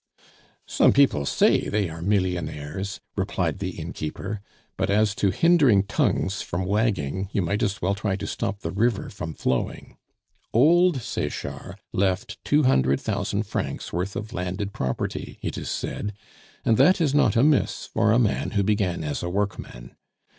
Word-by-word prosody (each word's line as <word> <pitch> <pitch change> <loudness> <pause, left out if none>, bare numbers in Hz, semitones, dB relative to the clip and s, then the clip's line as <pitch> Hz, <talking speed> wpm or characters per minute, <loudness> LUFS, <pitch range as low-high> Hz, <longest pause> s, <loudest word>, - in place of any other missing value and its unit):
"Some - - +4
people 125 - +3
say - - +3
they 105 -2 +1
are 80 0 -8
millionaires," 90 -1 -2 0.2
replied - - -1
the 95 -3 -4
innkeeper. 85 +5 -5 0.3
"But - - -1
as 105 0 +3
to 100 -1 +1
hindering 135 - +4
tongues 100 - 0
from 90 +2 -3
wagging, 95 - 0
you 100 - +1
might 100 +5 -1
as 100 -3 -1
well 95 +2 +2
try 100 -1 -1
to - - -5
stop 100 - -3
the - - -3
river 110 +1 0
from 85 -5 -6
flowing. 65 - -2 0.6
Old 160 +2 +4
Sechard - - -4 0.2
left 95 0 -1
two 150 +1 +3
hundred 70 - +3
thousand - - -1
francs' - - -4
worth 90 +4 -2
of 105 +3 -5
landed 90 +3 -3
property, 65 -1 -3
it - - -3
is - - -5
said; 105 0 -3 0.5
and 115 - +4
that 185 +1 +5
is 150 -5 +2
not 125 -8 +3
amiss 140 +4 +2
for 110 - +1
a 115 - +4
man 115 -4 +1
who 100 - +3
began 95 -5 0
as 75 -1 -3
a 85 - -3
workman. 95 -11 -4
100 Hz, 160 wpm, -25 LUFS, 90-110 Hz, 0.6 s, that